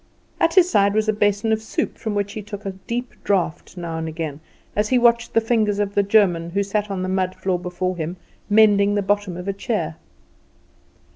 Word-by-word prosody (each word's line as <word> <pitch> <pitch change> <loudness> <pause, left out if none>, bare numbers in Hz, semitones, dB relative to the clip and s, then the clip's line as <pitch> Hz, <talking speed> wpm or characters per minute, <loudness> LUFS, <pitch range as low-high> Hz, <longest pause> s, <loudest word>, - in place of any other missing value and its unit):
At 330 0 +2
his 365 -2 +7
side 200 - +3
was 215 0 +1
a 215 - +3
basin 205 +1 +1
of 220 0 +1
soup, 220 - -3
from 220 -2 -4
which 205 0 -1
he 215 - -5
took 205 0 -8
a 195 - -2
deep 235 +6 -5
draught 185 -2 -1
now 165 -2 -4
and 160 - -3
again 160 -2 -5 0.4
as 210 +1 +1
he 255 - +4
watched 235 -1 +3
the - - +7
fingers 220 -3 +1
of 205 -1 -1
the 200 - +3
German, 195 -5 +3
who 200 +3 0
sat 210 +1 -2
on 190 -2 -3
the - - -2
mud 185 -1 -1
floor 185 -2 -1 0.9
mending 205 -1 +5
the 205 - +1
bottom 205 -3 0
of 180 +2 -7
a 200 - 0
chair. 195 -7 -3
205 Hz, 205 wpm, -22 LUFS, 185-215 Hz, 0.9 s, his